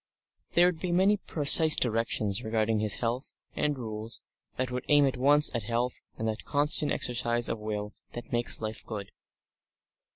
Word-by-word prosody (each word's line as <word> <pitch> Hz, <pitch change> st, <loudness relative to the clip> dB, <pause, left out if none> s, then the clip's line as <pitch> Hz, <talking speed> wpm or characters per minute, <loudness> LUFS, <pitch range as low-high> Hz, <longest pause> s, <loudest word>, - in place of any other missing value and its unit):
There 175 Hz, -, +5 dB
would 180 Hz, -2 st, 0 dB
be 180 Hz, 0 st, -3 dB
many 190 Hz, +4 st, +3 dB
precise 155 Hz, -3 st, +4 dB
directions 115 Hz, -2 st, 0 dB
regarding 110 Hz, 0 st, 0 dB
his 105 Hz, -1 st, +3 dB
health, 120 Hz, +3 st, -4 dB, 0.2 s
and 150 Hz, -1 st, -1 dB
rules 110 Hz, -2 st, -5 dB, 0.3 s
that 130 Hz, -1 st, -2 dB
would 125 Hz, 0 st, -4 dB
aim 145 Hz, -1 st, +5 dB
at 135 Hz, -, -1 dB
once 145 Hz, +4 st, +4 dB
at 120 Hz, -, -1 dB
health 120 Hz, +3 st, -2 dB, 0.2 s
and 110 Hz, -, -3 dB
that 110 Hz, 0 st, -4 dB
constant 145 Hz, +1 st, +1 dB
exercise 120 Hz, -1 st, 0 dB
of 115 Hz, -, -3 dB
will 105 Hz, -1 st, -5 dB, 0.2 s
that 120 Hz, -, -8 dB
makes 120 Hz, 0 st, +1 dB
life 110 Hz, 0 st, -5 dB
good. 105 Hz, -3 st, -7 dB
120 Hz, 165 wpm, -28 LUFS, 110-145 Hz, 0.3 s, There